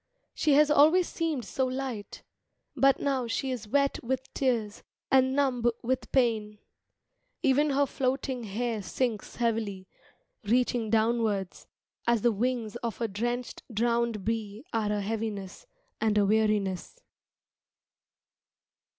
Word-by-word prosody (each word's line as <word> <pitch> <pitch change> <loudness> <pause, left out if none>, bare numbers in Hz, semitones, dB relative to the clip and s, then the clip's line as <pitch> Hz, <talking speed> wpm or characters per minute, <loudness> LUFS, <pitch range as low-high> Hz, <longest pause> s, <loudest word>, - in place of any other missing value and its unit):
She 300 - +2
has 295 +1 +5
always 315 +5 +5
seemed 315 -8 -2
so 255 +8 -1
light, 255 -5 -5 0.5
But 275 0 +4
now 265 -4 0
she 260 +3 -2
is 235 -4 -5
wet 280 +5 +1
with 260 +2 -3
tears 230 -6 -1 0.3
and 260 0 +4
numb 265 -4 +1 0.2
with 250 -1 -2
pain 220 -5 +1 0.9
Even 285 +3 +3
her 280 0 +3
floating 260 -2 -2
hair 220 +2 -2
sinks 225 +1 -2
heavily, 220 -5 -1 0.6
Reaching 235 0 +1
downwards; 220 -4 0 0.4
As 235 -3 +2
the 240 - +5
wings 235 0 -1
of 235 -3 -4
a 230 - 0
drenched, 240 +4 -3
drowned 235 -2 0
bee 220 +1 -3
Are 215 -2 0
a 210 -1 0
heaviness, 210 - -4 0.3
and 215 -1 +1
a 205 - +4
weariness. 210 - 0
235 Hz, 125 wpm, -28 LUFS, 215-260 Hz, 0.9 s, has